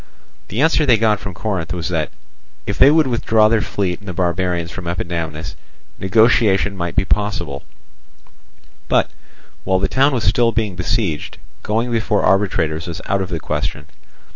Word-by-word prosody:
The 110 +7 -2
answer 160 -1 +3
they 125 -6 +4
got 105 -2 +2
from 100 -3 -7
Corinth 90 -5 -3
was 85 0 -3
that, 80 -3 -1 0.6
if 100 - -2
they 135 - +8
would 155 +1 +4
withdraw 115 -3 +3
their 110 0 +2
fleet 95 -4 -2
and 100 - -15
the 90 - -4
barbarians 85 -1 -1
from 90 -3 -7
Epidamnus, 85 -2 -4 0.4
negotiation 105 -1 +3
might 85 -2 -4
be - - +2
possible; 105 0 -1 1.3
but, - - +2 0.5
while 95 - +1
the 95 - 0
town 135 +2 +3
was 120 -5 -1
still 120 -1 +3
being 110 -5 -2
besieged, 90 -2 -2 0.2
going 115 +3 -1
before 110 -2 0
arbitrators 85 -5 +1
was 85 0 -5
out 100 0 0
of 95 - -4
the 85 -3 -3
question. 75 +1 -3
95 Hz, 165 wpm, -19 LUFS, 85-110 Hz, 1.3 s, they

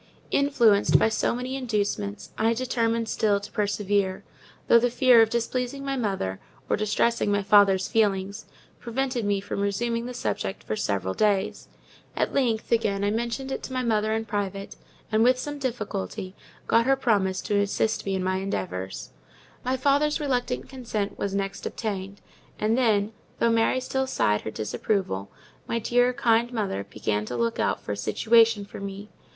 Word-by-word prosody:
Influenced 240 -8 +4
by - - +3
so 220 - 0
many 250 +2 -4
inducements, 205 - -2
I 225 +1 +2
determined 230 -2 0
still 210 -2 +1
to 200 - -10
persevere; 205 -2 0 0.4
though 235 - +7
the 245 +1 +2
fear 245 -1 +6
of 225 - +4
displeasing 250 +4 -2
my 275 0 -1
mother, 195 - -2 0.3
or - - +2
distressing 215 +1 +1
my 205 0 +1
father's 195 -2 +5
feelings, 200 -1 0 0.3
prevented 250 -1 -2
me 205 -1 +1
from 200 - -5
resuming 230 +4 -1
the 250 - -6
subject 95 - -3
for 110 - -3
several 95 -3 -1
days. 205 - 0 0.5
At - - 0
length, 235 -5 0
again, 205 -4 +1
I 205 - +2
mentioned 235 +4 -2
it - - -3
to 260 - -7
my 255 0 -1
mother 215 -2 +1
in 225 0 -2
private; 200 -2 -4 0.4
and, 215 0 +3
with 250 +1 +5
some 290 +3 -5
difficulty, 210 - -4 0.3
got 230 +2 +3
her 270 - +5
to - - -19
promise 195 -7 +1
to 205 -2 0
assist 210 +2 0
me 195 -1 -1
with 185 - -2
her 185 0 +1
endeavours. 95 - -4 0.5
My 255 +1 0
father's 285 +3 +2
reluctant 250 -4 -1
consent 225 -6 -4
was 200 -1 -2
next 195 0 -3
obtained, 200 -3 -5 0.4
and 215 +2 +1
then, 220 -4 +2 0.2
though 235 - +2
Mary 230 +3 +2
still 265 +1 -2
sighed 105 - +1
her - - -5
disapproval, 105 - -2 0.4
my 230 - -1
dear, 245 +2 +2
kind 235 -2 +2
mother 205 - -2
began 105 -1 -1
to 120 - -4
look 115 -1 -1
out - - +1
for - - -6
a - - -1
situation 225 - +3
for 200 - -10
me. 200 +1 -7
215 Hz, 170 wpm, -26 LUFS, 195-240 Hz, 0.5 s, though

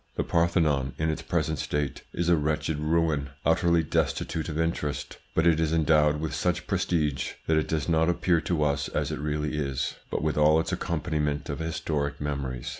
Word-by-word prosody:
The - - 0
Parthenon, 80 -6 +1
in 80 0 +1
its 80 - -4
present 80 -3 -1
state, 75 -2 -2
is 85 - -2
a 85 - +5
wretched 75 0 -1
ruin, 75 -2 +1 0.2
utterly 85 +1 +3
destitute 80 +1 -1
of 80 0 -3
interest, 80 -3 -2 0.2
but 80 - +3
it 85 -2 +4
is 80 -1 +1
endowed 75 -2 +3
with 80 0 -3
such - - 0
prestige 75 -6 0
that 80 - +2
it 80 - +1
does 80 -3 -1
not 80 0 +3
appear 85 -1 +2
to 85 -3 0
us 70 -1 0
as - - -1
it - - -3
really 75 0 -2
is, 70 -2 -2
but - - -2
with 75 -1 0
all 75 +1 +5
its 80 - -2
accompaniment 75 -3 -1
of 70 - -5
historic 80 -3 -2
memories. 70 -4 -3
75 Hz, 190 wpm, -27 LUFS, 75-80 Hz, 0.2 s, a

